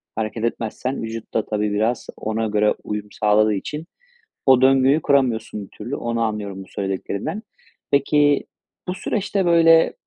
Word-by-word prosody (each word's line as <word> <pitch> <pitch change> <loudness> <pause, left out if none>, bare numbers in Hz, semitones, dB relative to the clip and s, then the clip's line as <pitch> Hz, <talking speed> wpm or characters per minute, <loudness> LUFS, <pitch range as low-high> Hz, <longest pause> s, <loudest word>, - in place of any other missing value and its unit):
hareket 110 +1 -3
etmezsen 115 +3 -2
vücut 115 0 -7
da, 110 - 0
tabii, 105 -1 -1
biraz 110 +3 0
ona 110 +1 -2
göre 105 0 +2
uyum 105 0 -4
sağladığı 105 0 +3
için 150 +10 -4 0.6
o 130 -2 +6
döngüyü 135 +3 +4
kuramıyorsun 120 -7 +1
bir - - -21
türlü. 120 +6 -4
Onu 115 0 -2
anlıyorum 105 -3 -3
bu - - -18
söylediklerinden. 100 - -4 0.5
Peki, 145 +1 +3 0.4
bu 180 - -1
süreçte 195 -1 -1
böyle 165 -1 +5
115 Hz, 145 wpm, -22 LUFS, 105-140 Hz, 0.6 s, o